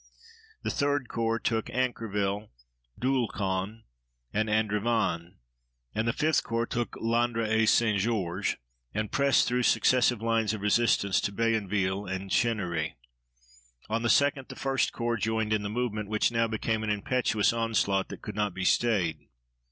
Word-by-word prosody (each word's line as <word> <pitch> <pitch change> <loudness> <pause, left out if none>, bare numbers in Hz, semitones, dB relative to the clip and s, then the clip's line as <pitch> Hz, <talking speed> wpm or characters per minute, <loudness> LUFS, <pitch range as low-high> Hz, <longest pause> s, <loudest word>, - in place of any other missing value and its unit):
The - - -1
3d 140 -3 0
Corps 115 0 0
took 115 -1 -1
Ancreville, 105 -5 -2 0.5
Doulcon, 110 -5 -1 0.5
and 110 +1 0
Andevanne, 105 -5 0 0.6
and 110 +2 -1
the - - +3
5th 155 +4 +1
Corps 115 0 -1
took 120 0 -3
Landres 115 0 0
et 110 0 +3
St. 110 -4 +3
Georges 95 -3 -1 0.4
and 110 -1 -2
pressed 140 -1 +3
through 125 0 +1
successive 125 -1 +3
lines 115 -1 +1
of 105 - -8
resistance 105 -2 +2
to - - -1
Bayonville 100 -3 0
and 95 +1 -4
Chennery. 90 -9 0 1.0
On 115 +1 +1
the 120 - 0
2d 140 0 +3
the - - -9
1st 135 -1 0
Corps 120 -1 -1
joined 110 +1 0
in 105 - +1
the 100 - -3
movement, 105 -2 -2
which 110 +2 +1
now 115 0 +2
became 110 0 -1
an 110 - -2
impetuous 105 +1 +1
onslaught 110 -4 0
that - - -9
could - - -5
not 105 -3 -1
be 95 -1 -3
stayed. 85 -12 +1
110 Hz, 150 wpm, -28 LUFS, 100-120 Hz, 1.0 s, the